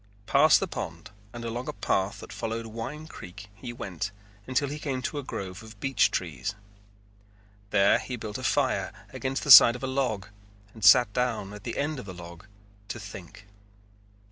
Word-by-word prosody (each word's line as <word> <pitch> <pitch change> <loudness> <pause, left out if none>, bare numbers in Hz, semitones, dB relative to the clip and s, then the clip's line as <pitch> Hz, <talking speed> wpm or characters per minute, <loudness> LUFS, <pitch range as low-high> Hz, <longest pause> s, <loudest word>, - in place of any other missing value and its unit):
Past 140 +7 +5
the 195 - -2
pond 85 - -6 0.2
and 120 +1 -7
along 120 +2 -4
a - - -3
path 100 0 -1
that - - -10
followed 115 0 -4
Wine 115 +8 -6
Creek 105 - -11
he 120 +4 -8
went 105 -3 -5 0.4
until 130 +2 +1
he 145 +2 -5
came 130 -4 -3
to 145 - -2
a - - -6
grove 95 -4 -6
of 110 -1 -13
beech 135 +4 +3
trees. 85 +1 -3 1.1
There 100 0 +4
he 125 - -5
built 110 -3 -6
a - - -8
fire - - +1 0.2
against 135 +1 -3
the 145 - +3
side 120 -1 +11
of 125 - -8
a - - +1
log 130 -7 -1 0.5
and 110 - -12
sat 110 +1 +7
down 115 -5 -1
at 105 -1 -11
the 120 - -4
end 145 0 -1
of 125 - -8
the 90 - -7
log 85 +2 -11 0.4
to 115 - -5
think. 100 -1 -10
115 Hz, 185 wpm, -27 LUFS, 100-130 Hz, 1.1 s, side